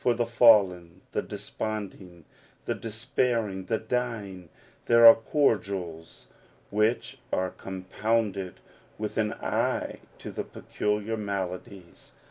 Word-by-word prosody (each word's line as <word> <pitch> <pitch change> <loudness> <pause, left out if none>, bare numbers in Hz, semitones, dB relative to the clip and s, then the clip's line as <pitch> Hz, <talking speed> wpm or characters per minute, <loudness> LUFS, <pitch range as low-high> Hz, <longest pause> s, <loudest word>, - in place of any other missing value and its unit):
For 120 - +3
the 120 0 0
fallen, 95 -7 +4
the - - 0
desponding, 95 -6 -6 0.4
the - - 0
despairing, 115 -4 -2
the 110 - 0
dying, 110 -7 -3 0.4
there 115 0 +7
are 115 - +13
cordials 100 - -1 0.4
which 105 +3 0
are 95 0 0
compounded 95 +1 -2 0.4
with 105 0 -4
an 105 -1 +1
eye - - -1 0.2
to - - -8
their - - -4
peculiar 105 +1 -2
maladies. 100 -2 -6
105 Hz, 105 wpm, -27 LUFS, 95-115 Hz, 0.4 s, are